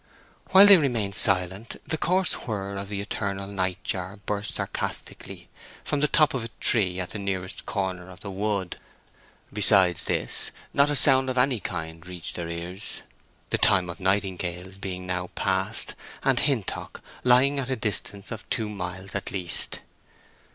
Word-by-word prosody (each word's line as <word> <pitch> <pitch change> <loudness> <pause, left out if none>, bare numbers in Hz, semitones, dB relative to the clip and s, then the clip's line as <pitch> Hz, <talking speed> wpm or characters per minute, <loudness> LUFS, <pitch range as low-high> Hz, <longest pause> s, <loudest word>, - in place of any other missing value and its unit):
While 195 +1 +8
they 200 -1 +9
remain 120 - 0
silent 95 +3 +2
the - - -2
coarse 180 +3 +1
whir 100 -3 -3
of 100 0 -6
the 100 -1 -3
eternal 100 -1 -4
night 95 -2 -3
jar 95 +2 -3
burst 105 0 -2
sarcastically - - -5 0.4
from 145 - -1
the 150 - +2
top 155 0 +4
of 130 -4 -2
a - - -4
tree 95 -6 +3
at 90 - -4
the 105 - -4
nearest 95 -2 -4
corner 95 -2 -3
of 90 -1 -14
the 100 - -6
wood. 100 -2 -2 0.8
Besides 95 -4 +4
this - - -1 0.2
not 140 +1 +4
a 145 - 0
sound 130 -1 +7
of 130 - -3
any 125 -2 +2
kind 80 -3 -6
reached 90 -2 -1
their 85 -1 -5
ears, 85 +3 -3 0.5
the - - +1
time 90 -3 +4
of 85 - -11
nightingales 95 -1 -2
being 90 -2 -5
now 90 0 -3
past, - - -1 0.3
and 135 -2 +3
Hintock 135 - -2 0.2
lying 130 +3 +4
at 135 -1 -3
a 130 - 0
distance 105 -3 -3
of 115 -1 -8
two 110 -2 -1
miles 95 0 -6
at - - -3
least. 90 -3 -1
100 Hz, 165 wpm, -25 LUFS, 90-120 Hz, 0.8 s, they